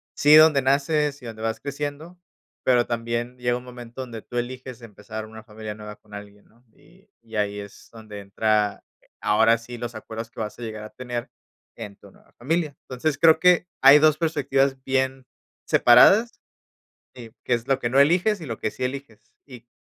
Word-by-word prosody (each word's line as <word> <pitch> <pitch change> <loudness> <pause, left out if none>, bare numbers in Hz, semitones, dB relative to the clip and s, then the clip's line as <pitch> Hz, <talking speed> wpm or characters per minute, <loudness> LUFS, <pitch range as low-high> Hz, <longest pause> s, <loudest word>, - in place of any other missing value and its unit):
sí, 150 +1 +6
donde 155 -3 +7
naces 145 +1 0
y - - -12
donde 110 -1 -8
vas 110 0 -2
creciendo, 145 +4 -6 0.5
pero 120 -2 +3
también 120 +1 -4
llega 120 0 -1
un 125 - -10
momento 125 0 -10
donde 115 -4 -8
tú 120 - -8
eliges 125 0 -6
empezar 110 0 -9
una 110 0 -12
familia 110 -1 -8
nueva 105 0 -10
con 105 -1 -22
alguien, 105 0 -11
¿no?, 120 +2 -28
y 195 - -24
y 115 -1 -12
ahí 105 0 -1
es 100 0 -12
donde 110 -2 -11
entra, 105 +1 -1 0.2
eh, - - -30
ahora 115 +2 +3
sí 120 +1 -10
los 120 0 -6
acuerdos 110 +1 -8
que - - -13
vas 105 -1 -5
a - - -10
llegar 110 -2 -6
a 110 - -9
tener 120 -2 -6 0.5
en 105 -3 -9
tu - - -18
nueva - - -25
familia. 150 +3 -2
Entonces, 140 +3 -3
creo 160 +1 +5
que 180 0 +4 0.2
hay 135 +2 +9
2 155 0 +4
perspectivas 140 -4 0
bien 130 0 -1 0.4
separadas, 200 - +5 0.8
eh, 115 -3 -11
que 125 - 0
es 120 +1 -2
lo 135 -1 +1
que 120 - -2
no 135 +2 +3
eliges 180 +8 +3
y - - -7
lo 115 -5 -6
que - - -2
sí 130 - -7
eliges, 125 -5 -7
y 125 -4 -14
120 Hz, 195 wpm, -23 LUFS, 110-140 Hz, 0.8 s, hay